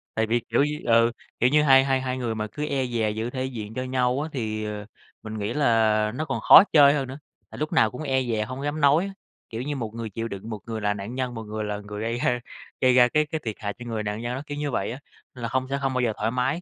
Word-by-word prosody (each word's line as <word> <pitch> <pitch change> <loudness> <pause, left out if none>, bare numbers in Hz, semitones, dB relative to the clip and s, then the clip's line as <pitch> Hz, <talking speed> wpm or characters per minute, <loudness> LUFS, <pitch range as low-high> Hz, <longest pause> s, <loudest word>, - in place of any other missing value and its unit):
Tại 110 - +2
vì, 120 +2 +2
kiểu 115 +4 +3
như 150 +1 -2
ừ, 115 0 +4 0.3
kiểu 125 - +4
như 150 +2 +4
hai 135 -2 +7
hai 135 -1 +1
hai 130 0 -2
người 120 -3 -2
mà 110 0 -3
cứ 150 - -3
e 140 -3 -1
dè 115 -3 0
giữ 110 +2 -3
thể 130 +1 -3
diện 110 -5 -6
cho 130 - -3
nhau 130 +1 0
á, 155 - -4
thì, 110 -4 -3
ờ, 105 -1 -5 0.4
mình 110 0 -6
nghĩ 105 +3 -2
là 110 -6 +3
nó 155 - -2
còn 135 -5 -2
khó 165 - +10
chơi 145 -2 +8
hơn 140 -3 -1
nữa. 130 +1 -7 0.3
Tại - - -11
lúc 155 +1 -3
nào 110 - +4
cũng 125 - -7
e 130 -3 +1
dè 110 -3 -1
hông 130 +4 -6
dám 145 +1 -2
nói 145 +6 +4
á. 195 - -6 0.4
Kiểu 115 +1 -5
như 145 +3 -3
một 115 -5 -4
người 115 -1 -5
chịu 115 +3 -4
đựng, 100 0 -7
một 110 -2 -5
người 110 -1 -4
là 105 0 +1
nạn 105 +4 -6
nhân, 130 -1 -2
một 115 - -5
người 110 0 -4
là 105 -1 -3
người 105 0 -7
gây 115 +2 -2
ra 125 0 +1 0.4
gây 130 -1 +5
ra 125 -1 +7
cái 150 +5 +2
cái 155 +1 -4
thiệt 110 -2 -3
hại 105 -1 -3
cho 120 - -8
người 115 -2 -3
nạn 105 +1 -3
nhân 120 +1 -3
đó, 130 - -4
kiểu 145 - -6
như 145 -1 -2
vậy - - -1
á, 125 - -7 0.4
nên 125 - -10
là 115 - -2
hông 130 0 0
sẽ 140 - 0
hông 135 -1 -1
bao 125 - 0
giờ 115 -3 +1
thoải 115 - 0
mái. 125 +7 0
120 Hz, 300 wpm, -25 LUFS, 110-135 Hz, 0.4 s, khó